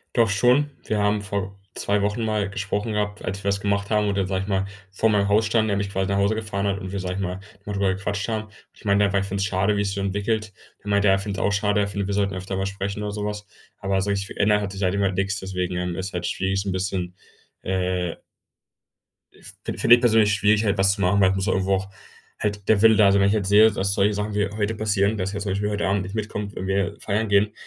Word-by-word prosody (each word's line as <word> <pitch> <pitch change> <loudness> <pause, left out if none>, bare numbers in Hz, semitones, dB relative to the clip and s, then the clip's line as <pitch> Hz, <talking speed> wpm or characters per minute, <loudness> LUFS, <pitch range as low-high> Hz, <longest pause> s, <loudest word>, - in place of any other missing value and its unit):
Doch 115 -3 +4
schon. 125 +8 +3 0.2
Wir 110 - -1
haben 105 0 +1
vor 100 -1 -4 0.2
2 100 0 0
Wochen 105 +3 -1
mal 105 -2 0
gesprochen 100 +2 -3
gehabt, 105 -1 -2
als 100 +1 -4
wir - - -4
was 100 0 +1
gemacht 100 0 0
haben 105 -1 +2
oder 100 -2 0
sage 95 0 -1
ich 95 - -6
mal, 95 -1 +1 0.3
vor 100 +3 +1
meinem 100 -1 +2
Haus 105 +2 +3
standen, 110 0 +1
er 100 - +1
mich 100 0 -2
quasi 95 0 -1
nach 100 - +1
Hause 100 +2 +2
gefahren 105 -2 -2
hat 100 0 -1
und 95 - -6
wir 100 - -3
sage 90 -1 -3
ich 95 - -4
mal, 90 0 -3 0.3
mal 105 - -5
drüber 100 -1 +1
gequatscht 100 0 -3
haben. 110 -1 -3 0.2
Ich - - -20
meine 100 -1 +3
halt, 100 - -1
weil 100 - +2
ich 100 - -3
finde 100 +1 -3
es 100 - +1
schade, 100 +1 +1
wie 100 - +1
sich 100 - -1
es - - -4
so 100 - -2
entwickelt. 105 +2 -1 0.3
Er 105 - -7
meint, 100 0 +2
ja, 95 -1 +5
ich 95 - -2
findet 100 -1 -4
es - - 0
auch - - +1
schade. 105 +1 +1
Er 100 - +1
findet, 100 -1 -3
wir 100 - -2
sollten 100 -1 0
öfter 95 +1 -4
mal 95 - -1
sprechen 100 +1 -4
oder 105 0 -3
so 105 0 -4
was. 105 0 -4 0.3
Aber 95 -1 0
so 100 - -2
wirklich 100 -1 0
verändert 105 +1 +2
hat 100 -1 -4
sich 95 +1 -4
halt 90 0 +2
immer 100 -1 +1
nix, 100 +1 -1
deswegen, 90 -1 -3
ähm, 90 -1 -2
ist 95 +1 -4
halt 90 0 -3
schwierig 95 +1 -1
so 100 - -7
'n - - -1
bisschen, 95 -1 -3 0.5
äh 90 -2 -1 1.5
fin - - -4
finde 120 - +7
ich 120 - -3
persönlich 110 -3 +4
schwierig, 105 +1 +3
halt 100 -1 +1
was 95 0 +4
zu 100 - -5
machen, 100 +2 +3
weil 95 - +6
es 95 - 0
muss 95 +1 -1
halt - - +2
irgendwo 95 +1 +1
auch 95 +1 -4 0.5
halt 105 -1 -3
der 105 -2 +4
Wille 110 -1 +7
da 100 -2 +5
sein. 100 0 +3
Wenn 100 - +4
ich 100 - +2
jetzt 105 -3 0
sehe, 110 +2 +7
dass 100 -1 0
solche 100 +1 +2
Sachen 105 +1 -3
wie 105 -1 0
heute 105 +1 -2
passieren, 105 0 +1
dass 95 0 -2
er 100 - -3
zum 100 -1 -3
Beispiel 100 +2 -1
heute 105 -1 -1
Abend 100 0 +1
nicht 95 +4 -7
mitkommt, 105 -1 -4
wenn 95 - -4
wir 95 -1 0
feiern 105 +1 -1
gehen, 100 +1 +3
100 Hz, 280 wpm, -23 LUFS, 95-105 Hz, 1.5 s, finde